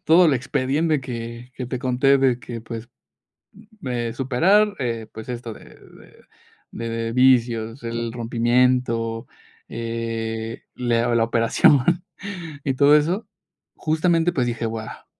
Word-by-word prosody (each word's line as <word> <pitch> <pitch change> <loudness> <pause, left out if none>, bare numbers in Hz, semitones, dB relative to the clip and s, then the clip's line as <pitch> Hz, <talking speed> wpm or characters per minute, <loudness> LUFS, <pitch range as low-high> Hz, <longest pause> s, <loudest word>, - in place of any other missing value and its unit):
todo 170 +2 +6
el 145 - +4
expediente 145 +4 0
que 120 0 -7
que 125 +1 -5
te 125 +1 -3
conté 130 +2 +3
de 130 -2 +2
que, 120 -1 -7
pues, 115 +1 -8 0.7
mm, 210 - -13
eh, 120 -2 -2
superar, 180 - +3
eh, 115 -4 -3
pues, 110 +2 -9
esto 120 -2 -5
de - - -14
de - - -19 0.6
de 115 0 -3
vicios, 120 -2 +3
el 115 0 -3
rompimiento, 120 0 +1 0.4
eh, 115 -1 -4
le 120 -1 +1
o 120 -1 +1
la 115 - +4
operación, 115 +5 +4 0.8
y 135 - 0
todo 145 +3 +5
eso, 175 +9 +1 0.5
justamente, 165 +2 +1
pues 125 -5 0
dije: 115 -1 -2
"Buah, 110 -1 -6
120 Hz, 135 wpm, -22 LUFS, 115-135 Hz, 0.8 s, todo